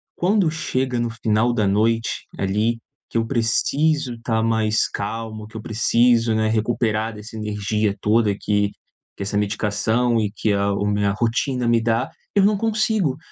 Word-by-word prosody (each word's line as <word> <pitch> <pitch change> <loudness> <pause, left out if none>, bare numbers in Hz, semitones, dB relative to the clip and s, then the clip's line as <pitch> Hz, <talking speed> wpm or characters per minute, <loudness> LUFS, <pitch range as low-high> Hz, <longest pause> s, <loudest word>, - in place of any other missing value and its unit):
quando 190 -1 +2
chega 130 -5 -2
no 120 0 0
final 115 +1 +1
da 105 -4 +1
noite, 115 +3 0
ali, 105 +4 0 0.3
que - - -2
eu 115 - +1
preciso 135 +3 +1
tá 110 -2 0
mais 110 -1 +1
calmo, 110 +1 -5
que 110 +1 -10
eu - - -6
preciso, 115 +1 +2
né, 110 0 +1
recuperar 110 0 0
dessa 110 +1 -10
energia 105 0 -1
toda 105 -1 +3
que 105 -1 +1 0.5
que 100 - -4
essa 100 +1 -2
medicação 105 +3 +1
e 105 -2 0
que 110 - 0
a 100 0 +1
o 100 +1 -1
minha 105 -1 +1
rotina 120 +3 0
me 115 -1 +3
dá, 115 0 0 0.3
eu 200 - +5
não 210 -1 +3
consigo! 215 - 0
115 Hz, 160 wpm, -22 LUFS, 105-120 Hz, 0.5 s, eu